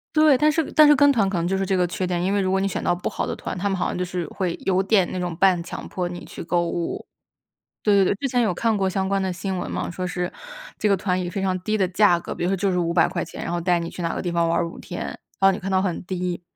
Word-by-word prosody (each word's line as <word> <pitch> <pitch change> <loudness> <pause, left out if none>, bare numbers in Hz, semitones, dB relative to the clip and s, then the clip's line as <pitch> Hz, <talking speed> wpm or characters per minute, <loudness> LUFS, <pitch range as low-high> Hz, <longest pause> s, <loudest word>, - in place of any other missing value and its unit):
对， 305 -2 +6
但 305 +2 +4
是 325 +1 +1
但 305 -1 +7
是 295 - +7
跟 285 +1 +5
团 220 -7 +2
可 190 - -2
能 170 - 0
就 190 - 0
是 195 0 0
这 190 0 +1
个 180 - +3
缺 185 +1 -3
点， 175 -1 -1
因 190 +2 +1
为 205 - +2
如 190 - 0
果 190 +1 +2
你 195 - +1
选 195 - -3
到 - - +2
不 175 - -4
好 - - -3
的 - - -3
团， - - -5
他 200 +3 -1
们 195 - -1
好 180 - -1
像 - - -2
就 180 - -1
是 180 -1 -3
会 180 -3 -3
有 190 0 +3
点 195 -2 +3
那 185 - -3
种 175 -2 -3
半 185 0 +3
强 - - -7
迫 180 -1 -3
你 175 0 -8
去 - - -8
购 170 0 0
物。 170 0 -3 0.8
对， 210 -2 +4
对， 195 -1 +5
对， 195 - +1
之 275 +7 -2
前 245 -1 +1
有 215 -5 +1
看 225 +5 +1
过 190 -1 +1
相 190 0 -1
关 195 0 0
的 190 -1 -1
新 185 +2 -3
闻 180 - -4
嘛， - - -3
说 180 +1 -4
是 180 0 -3 0.5
这 215 - +1
个 200 - +4
团 185 -1 -1
以 175 - -3
非 195 +2 -3
常 190 -1 0
低 215 +4 0
的 190 -3 +2
价 185 -1 +4
格， - - -6
比 - - -5
如 175 - +1
说 195 - +2
就 195 +1 0
是 180 - 0
¥500， 170 0 0
然 - - -3
后 175 - -1
带 175 0 +2
你 170 0 -4
去 - - -8
哪 170 -1 -1
个 - - -2
地 175 - -2
方 170 -1 +1
玩 165 0 +1
儿 170 - -1
5 - - -11
天， - - -6
然 - - -6 0.2
后 195 0 +6
你 190 - -4
看 195 - -5
到 190 -1 +2
很 185 -3 -2
低。 180 -1 -3
185 Hz, 340 characters per minute, -23 LUFS, 175-195 Hz, 0.8 s, 但